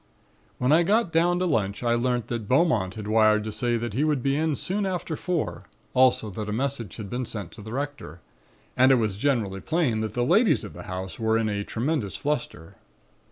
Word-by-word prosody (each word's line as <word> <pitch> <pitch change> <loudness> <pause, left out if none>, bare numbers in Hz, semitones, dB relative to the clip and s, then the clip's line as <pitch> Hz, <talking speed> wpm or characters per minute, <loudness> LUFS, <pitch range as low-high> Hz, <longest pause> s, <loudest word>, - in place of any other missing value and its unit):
"When 125 +2 +1
I 160 +3 +6
got 200 +1 +2
down 175 +2 +3
to 185 - 0
lunch 105 - 0
I 120 -1 +2
learnt 120 -1 0
that 115 -3 -4
Beaumont 125 - +2
had 105 -1 -6
wired 110 -1 +4
to 110 - -4
say 120 +2 0
that 115 -2 -4
he 135 +7 +1
would 150 -5 +1
be 135 0 +1
in 155 0 +1
soon 195 +5 -1
after 175 -3 -3
four; 175 0 -3 0.3
also 125 -4 +3
that 105 +2 -5
a - - -2
message 120 -3 -2
had 105 -3 -7
been 125 +5 -3
sent 105 -7 -6
to 110 - -12
the 110 +2 -8
Rector. 140 - -5 0.6
And 130 +1 +5
it - - +7
was 110 -5 0
generally 105 -5 0
plain 155 -10 0
that 110 -1 -4
the 120 0 +1
ladies 200 - +3
of 105 - -8
the 90 - -9
house 95 +2 -5
were 110 0 +2
in 115 -1 0
a 100 -1 -2
tremendous 115 - -2
fluster. 120 - -4
120 Hz, 215 wpm, -25 LUFS, 105-150 Hz, 0.6 s, it